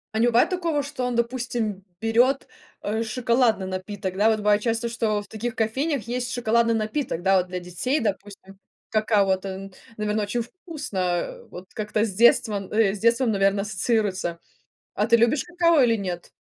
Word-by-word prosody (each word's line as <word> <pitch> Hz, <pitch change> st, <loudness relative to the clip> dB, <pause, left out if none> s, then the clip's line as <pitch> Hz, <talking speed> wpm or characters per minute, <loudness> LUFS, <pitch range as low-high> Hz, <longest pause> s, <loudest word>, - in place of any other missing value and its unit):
А -, -, +1 dB
не 240 Hz, -, +4 dB
бывает 240 Hz, +7 st, +4 dB
такого, 335 Hz, -5 st, 0 dB
что 280 Hz, -3 st, -5 dB
он, 245 Hz, -1 st, -1 dB
допустим, 235 Hz, -5 st, -2 dB, 0.2 s
берёт, 245 Hz, +5 st, +2 dB, 0.4 s
э, 220 Hz, +2 st, -1 dB
шоколадный 235 Hz, -4 st, +1 dB
напиток? 185 Hz, 0 st, -5 dB
Да, 210 Hz, +3 st, +4 dB
вот 220 Hz, -, +2 dB
бывает 210 Hz, 0 st, +3 dB
часто, 230 Hz, +1 st, -1 dB
что 220 Hz, -3 st, -1 dB
в -, -, -13 dB
таких 235 Hz, +2 st, -5 dB
кофейнях 265 Hz, +5 st, 0 dB
есть 245 Hz, +1 st, -3 dB
шоколадный 235 Hz, -1 st, +2 dB
напиток. 220 Hz, -, -2 dB
Да, 195 Hz, +1 st, +3 dB
вот 180 Hz, 0 st, 0 dB
для 180 Hz, 0 st, -4 dB
детей, 180 Hz, -, -1 dB
допустим, 195 Hz, -2 st, -5 dB, 0.3 s
какао, 215 Hz, -2 st, +3 dB
вот, 190 Hz, 0 st, 0 dB
эн 195 Hz, 0 st, -6 dB, 0.2 s
наверно, 210 Hz, 0 st, -1 dB
очень 235 Hz, +4 st, -1 dB
вкусно, 300 Hz, -, -8 dB
э, 175 Hz, -1 st, -2 dB
вот 180 Hz, +1 st, -9 dB
как-то 215 Hz, 0 st, -1 dB
с 200 Hz, -, -4 dB
детством, 210 Hz, -2 st, +3 dB
э, 210 Hz, -2 st, +3 dB
с -, -, -8 dB
детством, 235 Hz, +1 st, +3 dB
наверно, 195 Hz, 0 st, +2 dB
ассоциируется? 200 Hz, -4 st, -1 dB, 0.6 s
А 210 Hz, -, +1 dB
ты 235 Hz, 0 st, +5 dB
любишь 235 Hz, +7 st, +2 dB
какао 340 Hz, -4 st, +3 dB
или 230 Hz, -2 st, +3 dB
нет? 180 Hz, -4 st, -5 dB
220 Hz, 180 wpm, -24 LUFS, 195-240 Hz, 0.6 s, ты